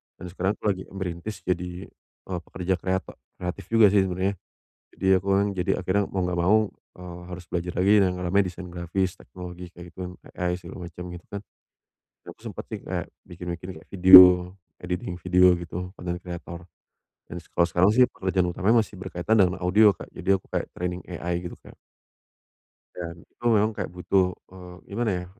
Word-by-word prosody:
dan - - -10
sekarang 95 +3 -1
aku - - -30
lagi 95 -1 -5
merintis 95 +2 -5
jadi, 90 0 -3 0.5
eee, 90 - -2
pekerja 95 0 -2
kreato 95 0 -2 0.2
kreatif 90 0 -6
juga 110 -3 +5
sih 100 -2 +3
sebenernya. 95 +1 -2 0.5
Jadi 95 - -4
aku 100 - -10
kan 100 - +3
jadi 90 -1 0
akhirnya 95 +3 +1
mau 95 - -2
enggak 90 -1 -1
mau, 100 +5 +5 0.4
eee, 90 -1 -9
harus 90 0 -8
belajar 90 0 -3
lagi 95 +3 +3
dan - - +5
yang - - -7
rame 95 +3 +2
desain 90 -1 -5
grafis, 90 +2 -1
teknologi, 90 -1 -9
kaya 85 0 -12
gitu, 90 -1 -7 0.2
AI, 90 0 -1
segala 90 0 -9
macam, 90 +1 -9
gitu 90 0 -10
kan. 100 0 -5 0.9
Aku - - -16
sempet - - -7
sih, - - -4
kayak - - -3 0.2
bikin-bikin 90 0 -7
kayak 80 - -15
video, 90 -1 +9 0.3
editing 90 0 -4
video, 90 +1 +5
gitu. 85 +1 -6
Content 90 0 -4
creator, 85 -1 -7 0.7
dan - - -9 0.2
kalau 85 0 +4
sekarang 90 +3 +3
sih 125 0 +7
pekerjaan 95 -1 -1
utamanya 100 +6 +3
masih - - -14
berkaitan 95 +3 -1
dengan 90 0 +2
audio, 100 +4 +5
Kak. - - -9
Jadi, - - -5
aku - - -21
kayak - - -1
training 90 0 -3
AI 90 0 -3
gitu, 90 - -7
Kak. - - -16 1.2
Dan 85 -1 -7
itu - - -20
memang 110 0 +3
kayak - - -4
butuh, 90 +1 0 0.2
eee, 90 -1 -11 0.2
gimana 115 0 0
ya, - - -13
90 Hz, 180 wpm, -25 LUFS, 90-95 Hz, 1.2 s, video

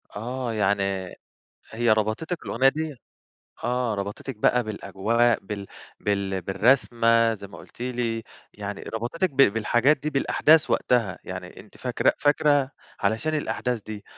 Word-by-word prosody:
آه 120 +2 -3
يعني 100 -3 0 0.6
هي 115 0 +1
ربطتِك 110 - -1
الأغنية 135 - +3
دي 155 +2 -2 0.7
آه 120 -1 0
ربطتِك 100 +5 -5
بقى 125 +3 +3
بالأجواء 110 +3 +1
بال 100 0 -6 0.3
بال 100 -2 -1
بالرسمة، 115 +3 +3
زي 100 -1 -9
ما 100 - -12
قُلتِ - - -12
لي، 120 -2 -2 0.3
يعني 105 -1 -6
ربطتِك 120 +11 -2
ب 135 - -20
بالحاجات 120 +3 +4
دي 150 +2 -2
بالأحداث 150 +2 +3
وقتها، 115 -6 +1
يعني - - -7
أنتِ - - -17
فاكرة - - +1
فاكرة 145 -2 +3 0.3
علشان 110 +10 0
الأحداث 125 -6 -2
دي. 105 0 -8
115 Hz, 130 wpm, -25 LUFS, 105-130 Hz, 0.7 s, بالحاجات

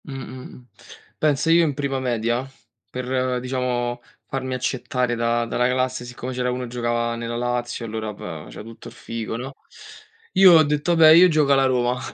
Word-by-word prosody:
Mh, - - -9
mh, 130 -1 -8
mh. 125 - -16 0.5
Pensa 155 +1 +2
io 170 +1 +6
in 150 -4 -1
prima 140 -2 -2
media 120 0 -1 0.4
per, 130 0 -2
diciamo, 125 -1 -2 0.2
farmi 130 -1 -4
accettare 125 -1 -2
da 115 0 0
dalla 125 +1 0
classe, 130 -1 -1
siccome 125 +1 -7
c'era 125 0 -1
uno 125 0 -3
che 125 - -7
giocava 120 -1 -1
nella 115 0 -5
Lazio 120 0 -3
allora 110 -1 -4
ba 80 -6 -8
faceva - - -10
tutto 115 +1 -12
il - - -11
figo, 115 -1 -5
no, 130 +3 -7 0.8
io 190 -1 +7
ho 160 -1 +7
detto: 150 +3 0
"Vabbè 160 -1 +7
io 170 +3 +8
gioco 155 -4 +2
alla 135 0 +3
Roma." 125 -1 +1
125 Hz, 185 wpm, -22 LUFS, 120-135 Hz, 0.8 s, io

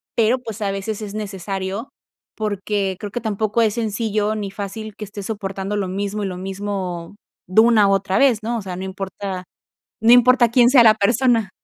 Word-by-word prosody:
pero, 235 +3 +3
pues 225 -3 -8
a 200 -1 0
veces 200 +2 -4
es 205 -2 -6
necesario, 195 +2 -4 0.5
porque 205 -2 -2
creo 205 -1 -6
que 240 - -4
tampoco 215 +1 0
es 215 -2 +2
sencillo 215 -1 -1
ni 205 -2 -4
fácil 205 +2 -6
que 210 - -7
esté 200 0 -8
soportando 195 -1 -4
lo 195 -2 -1
mismo 200 +2 -3
y - - -1
lo 180 -1 -5
mismo 190 -2 -5 0.3
de 185 +4 +5
una 225 -3 +5
otra 195 0 +1
vez, 260 -6 +4
¿no? 235 +1 -1
O - - -4
sea, 185 -2 -5
no 185 - -5
importa 190 -1 -5 0.6
no 230 - +6
importa 245 -1 +6
quién 240 0 +5
sea 255 -4 +7
la 215 -1 +7
persona. 230 0 +2
205 Hz, 190 wpm, -21 LUFS, 195-225 Hz, 0.6 s, sea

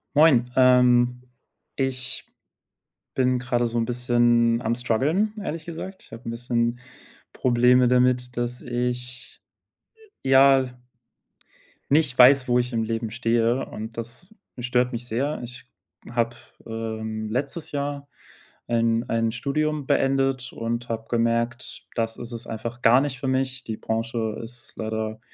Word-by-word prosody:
Moin, 135 -6 +5
ähm, 125 -1 +4 0.5
ich 130 -2 -1 0.9
bin 130 -1 +2
grade 120 -1 0
so 115 - -3
'n 115 - +1
bisschen 120 -1 +2
am 115 0 0
Strguggeln, 140 - +1
ehrlich 160 -4 -5
gesagt. 185 +3 -7
Ich - - -23
habe 115 +1 -7
'n - - -2
bisschen 120 0 -1 0.5
Probleme 125 0 +4
damit, 125 0 +2
dass 120 0 -2
ich, 125 0 -4 0.8
ja 135 0 +5 1.3
nicht 145 -3 +3
weiß, 130 +1 +7
wo 125 0 +3
ich 125 0 -1
im 115 -2 0
Leben 115 0 -2
stehe, 115 +2 +1
und 110 +2 -8
das 120 +10 -7 0.3
stört 125 0 +1
mich 120 0 -5
sehr. 135 +6 -2
Ich 125 +1 -9 0.5
habe, 120 -1 0 0.3
ähm, 110 -1 -4
letztes 140 +7 -3
Jahr 140 0 -3 0.6
ein 115 0 +1
ein 115 0 +1
Studium 145 +4 -1
beendet 135 -1 +1
und 115 +1 -3
habe 115 -1 -4
gemerkt: 115 +1 -1
Das 115 -1 -1
ist 120 0 -7
es 120 0 -6
einfach 115 +2 -6
gar 120 +3 +6
nicht 140 -3 -3
für 135 - -3
mich. 130 -1 -1
Die 110 - -4
Branche 115 -1 -2
ist 120 +3 -8
leider 110 0 -3
125 Hz, 135 wpm, -24 LUFS, 115-130 Hz, 1.3 s, weiß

